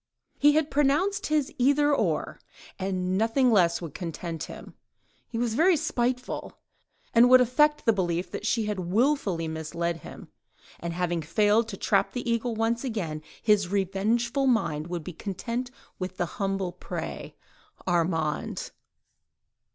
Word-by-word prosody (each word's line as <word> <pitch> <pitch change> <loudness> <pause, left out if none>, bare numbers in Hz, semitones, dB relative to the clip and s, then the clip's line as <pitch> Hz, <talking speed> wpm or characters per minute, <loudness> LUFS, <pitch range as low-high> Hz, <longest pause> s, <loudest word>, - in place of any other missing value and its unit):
He 295 +1 +6
had 310 0 +1
pronounced 295 +8 +2
his 300 -3 0
"Either—or—" 285 +3 +2 0.4
and 185 0 -1
nothing 240 +3 +3
less 175 -5 +3
would 160 -4 -6
content 165 -1 -5
him: - - -10 0.5
he 230 - -5
was 235 -1 0
very 335 +7 +4
spiteful, 250 -4 -2 0.6
and 240 +1 +6
would 255 0 +9
affect 295 +5 +3
the 225 - +5
belief 175 -2 -1
that - - -5
she 225 -2 +1
had 210 -2 -2
wilfully 195 - +1
misled 160 +2 -3
him, - - -11 0.5
and 170 0 -4
having 175 -1 -1
failed 210 +8 +2
to 200 -3 -6
trap - - +1
the 245 -1 -4
eagle 235 0 0
once 225 +2 0
again, 185 - -3 0.2
his 210 -4 +3
revengeful 215 +7 0
mind 165 - +1
would 175 -2 -4
be 180 - -7
content 230 +8 -4 0.3
with 185 0 -5
the 175 - 0
humble 195 0 -2
prey—Armand! 165 -4 -4
210 Hz, 135 wpm, -27 LUFS, 175-250 Hz, 0.6 s, would